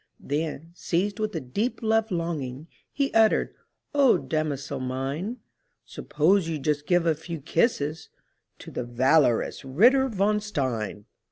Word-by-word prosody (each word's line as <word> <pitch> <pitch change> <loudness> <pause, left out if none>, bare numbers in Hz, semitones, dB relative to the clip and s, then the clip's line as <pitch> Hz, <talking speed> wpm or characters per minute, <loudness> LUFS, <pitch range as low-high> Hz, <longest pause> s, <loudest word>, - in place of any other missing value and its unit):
Then, 155 +2 -4
seized 190 +4 -1
with 215 0 -2
a - - 0
deep 210 - -3
love 225 0 +2
longing, 160 -5 -3 0.2
He 280 -1 -1
uttered, 220 -1 +3 0.4
"O 280 -4 +5
damosel 145 -3 -3
mine, 135 - -3 0.5
Suppose 165 +3 +1
you 160 - -2
just 150 +1 -2
give 175 -1 +3
a 165 - +3
few 165 +2 -7
kisses 155 - 0 0.5
To - - -11
the - - -3
valorous 125 +1 +2
Ritter 245 - +4
von 210 0 +1
Stein!" 125 - -3
160 Hz, 135 wpm, -26 LUFS, 140-210 Hz, 0.5 s, O